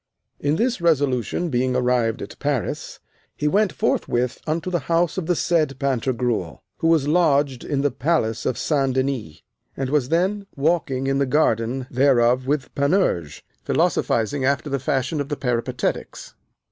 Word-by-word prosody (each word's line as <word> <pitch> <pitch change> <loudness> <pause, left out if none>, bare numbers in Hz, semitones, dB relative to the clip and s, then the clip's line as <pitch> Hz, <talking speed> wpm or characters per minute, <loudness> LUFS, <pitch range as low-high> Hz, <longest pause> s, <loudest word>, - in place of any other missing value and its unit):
In 145 +1 +1
this 240 +2 0
resolution 145 - +1
being 125 -1 0
arrived 125 -1 +1
at - - -10
Paris, 145 -5 -2 0.4
he 150 - 0
went 200 +4 +2
forthwith 120 -3 -1
unto 165 +3 -2
the 175 - +1
house 170 -1 +2
of 185 -4 -3
the 175 - +2
said 155 -5 +1
Pantagruel, 125 - -1
who 165 - 0
was 160 -4 +3
lodged 145 -5 +2
in 140 -2 -1
the 145 0 +1
palace 120 -5 0
of 125 - -1
St. 135 -4 0
Denis, 130 - -2 0.3
and 135 -1 -2
was 145 -4 +1
then 195 +4 0
walking 140 -3 0
in 135 0 +1
the 140 - +1
garden 125 -3 +1
thereof 125 -1 +3
with 145 -2 -1
Panurge, 140 - 0 0.2
philosophizing 115 +5 +1
after 140 +2 0
the 140 - 0
fashion 135 +3 -1
of 140 - -5
the 145 - -2
Peripatetics. 120 -3 -3
140 Hz, 155 wpm, -22 LUFS, 125-155 Hz, 0.4 s, was